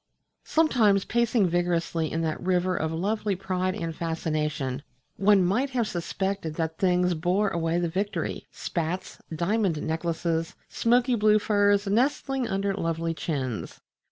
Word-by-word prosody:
Sometimes, 230 -11 +3
pacing 235 -3 +2
vigorously 170 -2 0
in 165 - -1
that 155 -1 -2
river 185 0 +1
of 160 - -1
lovely 205 +4 -1
pride 185 0 -2
and 165 -6 -4
fascination, 155 -5 -2 0.4
one 195 -2 +4
might 235 +10 +1
have 245 -4 0
suspected 190 -2 -3
that 160 0 -1
other 160 - -36
things 180 -1 +2
bore 180 +6 +1
away 165 -1 0
the 175 0 +1
victory 195 +5 -3
spats, 170 +1 -4 0.2
diamond 185 -1 +1
necklaces, 165 0 -2
smoky 245 +2 +2
blue 215 -2 +4
furs 205 -1 +2
nestling 260 +4 +1
under 195 +1 -1
lovely 165 -3 -1
chins.... 135 -8 -4
180 Hz, 135 wpm, -26 LUFS, 165-205 Hz, 0.4 s, one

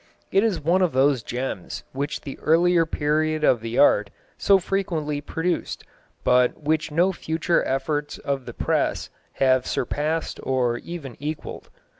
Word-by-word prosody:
It 195 - +4
is 220 -6 +1
one 170 +5 +2
of 180 -5 +2
those 135 -1 +3
gems 120 -6 -5
which 140 +3 -3
the 135 - -8
earlier 170 +1 +3
period 155 +1 0
of 120 -6 +4
the 115 +1 -4
art 105 -7 +5 0.3
so 200 - +4
frequently 170 -6 -2
produced, 165 +4 -2 0.4
but 125 0 +3
which 155 +1 0
no 175 +5 +2
future 170 0 0
efforts 145 +2 -2
of 135 -2 -3
the - - -6
press - - -1 0.2
have 130 -1 +2
surpassed 155 +5 -2
or 125 -2 0
even 155 -8 -8
equalled." 150 +2 -6
150 Hz, 145 wpm, -24 LUFS, 135-165 Hz, 0.4 s, art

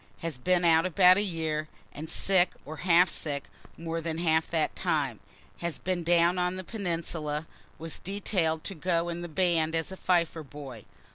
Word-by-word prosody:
has 165 -6 -4
been 180 +5 +2
out 165 -1 +5
about 185 0 +6
a - - +3
year, 160 -5 -2 0.3
and 155 +2 -7
sick 185 -2 +2
or 155 +2 -7
half 175 +1 +5
sick 145 -5 -4 0.3
more 165 0 -3
than 160 -1 -3
half 160 -1 +2
that 160 -2 0
time - - -1 0.4
has 170 -2 -3
been 180 -2 -2
down 175 +1 +3
on 180 +1 0
the 185 - -5
peninsula 165 -6 -3 0.3
was 165 0 -3
detail'd 180 -5 -1
to - - -3
go 170 0 0
in 170 0 -4
the 175 - -5
band 165 -1 +2
as 165 +2 -1
fifer 170 -3 +1
boy. 135 -6 -10
165 Hz, 170 wpm, -28 LUFS, 160-180 Hz, 0.4 s, about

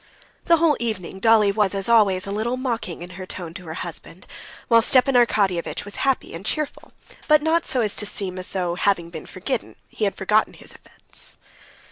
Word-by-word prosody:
The 335 -1 +5
whole 325 -2 +3
evening 210 -5 -4
Dolly 215 -1 +5
was, 200 -1 +1
as 195 0 -2
always, 205 -5 +4
a 200 - -5
little 225 +5 -1
mocking 230 -10 -3
in 175 - -10
her 185 - -7
tone 175 -3 -6
to 180 +1 -9
her 160 0 -6
husband, 175 +1 -7 0.4
while 230 -1 +6
Stepan 255 +3 +4
Arkadyevitch 205 -9 +1
was 205 - -7
happy 270 -1 0
and 165 +3 -7
cheerful, 300 +7 -4 0.4
but 305 -1 +5
not 330 +1 +2
so 255 - 0
as 210 -3 0
to 210 - -1
seem 185 -3 -5
as 185 - -6
though, 180 -3 -1
having 175 -2 0
been 160 -2 -8
forgiven, 220 +6 -4
he 215 - -2
had 200 - -1
forgotten 210 +3 +2
his - - -7
offense. - - -14
205 Hz, 195 wpm, -23 LUFS, 185-240 Hz, 0.4 s, while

